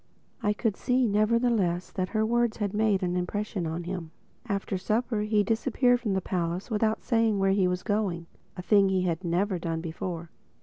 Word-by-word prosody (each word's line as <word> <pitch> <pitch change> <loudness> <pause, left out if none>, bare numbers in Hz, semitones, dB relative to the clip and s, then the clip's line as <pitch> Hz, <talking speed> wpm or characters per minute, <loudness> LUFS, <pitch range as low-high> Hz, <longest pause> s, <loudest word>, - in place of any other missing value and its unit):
I 210 - +2
could 215 -1 -1
see, 255 0 +2
nevertheless 215 -4 +1
that 185 -1 -2
her 220 -1 +1
words 235 0 +1
had 205 -2 -2
made 210 -3 +2
an 180 0 0
impression 185 0 -2
on 165 +2 -3
him. 175 -2 -5 0.4
After 200 -2 -2
supper 215 +4 0
he 210 0 +2
disappeared 245 +2 +2
from 220 -5 -1
the 190 - 0
palace 175 +4 -3
without 220 0 0
saying 225 -3 +2
where 195 0 +2
he 195 -1 +3
was 180 0 -2
going—a 185 -4 -3
thing 200 0 +4
he 190 -1 +1
had 175 0 -1
never 180 +2 0
done 165 -1 -2
before. 165 0 -5
200 Hz, 180 wpm, -27 LUFS, 180-220 Hz, 0.4 s, thing